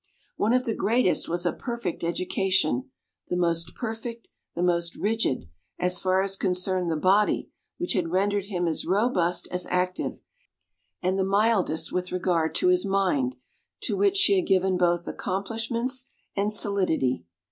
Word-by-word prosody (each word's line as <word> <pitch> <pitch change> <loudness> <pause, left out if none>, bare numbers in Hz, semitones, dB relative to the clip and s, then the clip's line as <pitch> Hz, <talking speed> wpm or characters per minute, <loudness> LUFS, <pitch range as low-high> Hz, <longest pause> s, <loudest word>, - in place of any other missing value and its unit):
One 215 - +1
of 255 +1 +2
the 225 - 0
greatest 230 -1 +1
was 175 +1 -1
a 175 - +1
perfect 235 -10 -4
education 175 -5 0 0.4
the 180 - -1
most 170 -1 0
perfect, 230 0 -6 0.3
the 175 - -1
most 170 -1 +1
rigid, 210 - -1 0.3
as 180 0 +1
far 190 0 +2
as 195 0 0
concerned 185 -1 0
the 160 - 0
body, 195 +6 +2 0.3
which 350 -4 -1
had 180 -6 0
rendered 200 +2 +1
him 180 -4 -2
as 160 - -1
robust 180 -3 +1
as 180 0 -1
active; 180 0 -1 0.8
and 185 +2 +1
the - - +3
mildest 200 -4 +2
with 180 0 -2
regard 175 -3 0
to 365 - +3
his 365 0 +4
mind, 255 +8 +1 0.5
to - - 0
which 400 -1 +2
she 400 0 +6
had 370 - 0
given 190 -1 +3
both 175 -1 +1
accomplishments 230 +6 -2 0.2
and 205 +1 +1
solidity. 185 - +1
190 Hz, 155 wpm, -26 LUFS, 175-225 Hz, 0.8 s, she